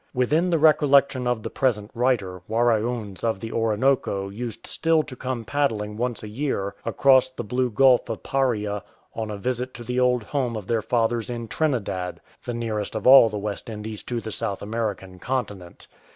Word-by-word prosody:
Within 150 +8 +2
the 170 - +3
recollection 140 -4 +4
of 120 -3 -1
the - - -5
present 110 -6 0
writer, 110 -8 0
Waraoons 115 -3 0
of 115 -4 0
the 115 +2 -6
Orinoco 110 -3 +1
used 115 +2 -6
still 165 -1 +1
to 140 -3 -9
come 125 -2 -4
paddling 110 -6 -1
once 120 0 -3
a - - -6
year 105 -4 -2
across 130 -1 +4
the 130 - -6
blue 125 +4 0
Gulf 125 +2 +4
of 110 - -5
Paria 105 -7 0 0.3
on 110 -1 -4
a 105 - -4
visit 125 +4 -3
to 120 - -8
the 125 +2 -2
old 125 -2 +2
home 125 -1 -2
of 105 - -7
their 115 +1 0
fathers 115 0 0
in 120 -1 -4
Trinidad 105 - -2
— - - -31
the 120 - -3
nearest 110 -3 -3
of 110 - -4
all 130 -3 +9
the 105 - -4
West 105 +2 -5
Indies 110 -1 -6
to 120 -1 -2
the 110 - -6
South 100 -2 -2
American 100 -4 -4
Continent. 105 -9 -4
115 Hz, 185 wpm, -24 LUFS, 105-130 Hz, 0.3 s, all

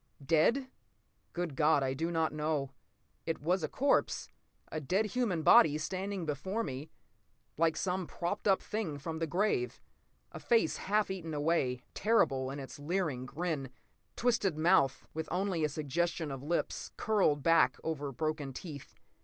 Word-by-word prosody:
Dead? 170 - +3 0.6
Good 175 -5 -3
God, 150 -1 +4
I 130 0 0
do 165 +5 -2
not 160 -2 0
know. 150 -3 -1 0.6
It 165 - -1
was 175 +5 +1
a 155 - -1
corpse, 280 +2 +1 0.4
a 155 - -2
dead 190 +10 +1
human 215 -8 -1
body, 150 -1 +7
standing 190 +3 -3
before 190 +9 -2
me 135 +2 -5 0.7
like 160 0 +2
some 185 -2 -1
propped 180 +5 -3
up 195 -1 +3
thing 210 -9 -3
from 160 +3 -5
the 165 - -1
grave. 175 - 0 0.5
A - - -8
face 225 -9 +2
half 210 0 +1
eaten 165 -5 -5
away, 145 -5 0
terrible 135 -12 +2
in 140 +1 -5
its 135 +2 -8
leering 150 -5 -1
grin. 150 -2 -3 0.5
Twisted 220 -9 +1
mouth, 155 -5 +3
with 160 0 -4
only 180 -2 0
a 150 - +2
suggestion 155 +2 -1
of 135 -1 -5
lips, 165 +5 -2
curled 190 -10 +2
back 165 0 +4
over 145 -3 -3
broken 150 +1 -3
teeth. 145 -1 -9
160 Hz, 155 wpm, -32 LUFS, 145-185 Hz, 0.7 s, body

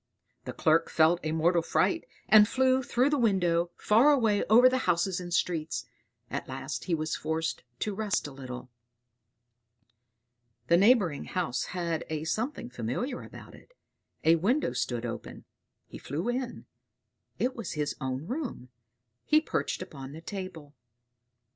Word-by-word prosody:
The - - -4
Clerk 160 +1 +2
felt 165 +2 +4
a 155 - -2
mortal 170 +2 +2
fright, 330 - 0 0.2
and 210 -1 +8
flew 260 +1 +2
through 255 +2 +1
the 295 - +2
window, 175 -6 +2
far 235 +8 +5
away 225 -7 +3
over 240 +4 +7
the 255 0 +2
houses 180 +2 +1
and 175 -1 -7
streets. 165 -3 -1 0.5
At - - -4
last 135 0 -5
he 175 - +1
was 155 0 -2
forced 160 +1 -2 0.2
to 210 - -1
rest 210 -1 -1
a 145 - -6
little. 130 -2 -8 2.0
The 170 - +6
neighboring 195 - +3
house 170 -9 -2
had 170 -3 -2
a 155 -1 -3
something 220 - -3
familiar 125 - -3
about - - -12
it; - - -18 0.5
a 165 +1 +5
window 210 - +1
stood 120 -1 -2
open; 115 0 -7 0.4
he - - -11
flew 155 - -4
in; 250 0 -3 0.7
it 255 +1 0
was 230 -7 -5
his 150 -1 -2
own 130 +2 -3
room. 245 - -5 0.5
He 305 - +4
perched 310 - -2
upon 135 -1 -9
the 160 - -9
table. 170 -6 -7
175 Hz, 150 wpm, -29 LUFS, 155-230 Hz, 2.0 s, and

